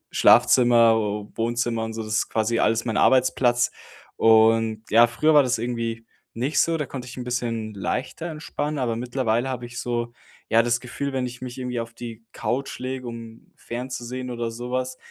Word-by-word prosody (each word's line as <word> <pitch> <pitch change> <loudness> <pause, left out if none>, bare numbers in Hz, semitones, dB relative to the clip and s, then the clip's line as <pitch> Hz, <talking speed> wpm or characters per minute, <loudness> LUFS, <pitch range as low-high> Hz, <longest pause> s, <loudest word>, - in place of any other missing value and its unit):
Schlafzimmer, 120 -2 +5 0.4
Wohnzimmer 115 0 -1
und 110 0 -5
so, 115 - -4
das 110 -1 -6
ist - - +1
quasi 115 +1 0
alles 115 0 +2
mein 115 -3 -1
Arbeitsplatz. 125 -2 +3 0.5
Und 110 0 +4
ja, 115 +2 +7
früher 135 +7 +2
war 145 - +8
das 125 -2 0
irgendwie 115 -1 -3 0.3
nicht 130 +6 0
so, 165 0 +2
da 150 - -2
konnte 125 -2 -7
ich 120 - -10
'n 125 - -5
bisschen 115 -3 -3
leichter 130 - -3
entspannen, 150 -1 -4
aber 120 -3 0
mittlerweile 120 0 -1
habe 125 -2 -4
ich 120 0 -9
so, 120 -1 -2 0.4
ja, 115 +1 +5
das 120 0 0
Gefühl, 135 +3 -4
wenn 130 -1 0
ich 125 0 -8
mich 125 -1 -6
irgendwie 125 -2 -3
auf 115 0 -7
die 115 -1 -9
Couch 135 +3 -3
lege, 130 0 -5
um 115 -1 -10
fernzusehen 125 +1 -6
oder 120 -1 -3
so 120 +2 -7
was, 130 0 -2
120 Hz, 185 wpm, -24 LUFS, 115-125 Hz, 0.5 s, war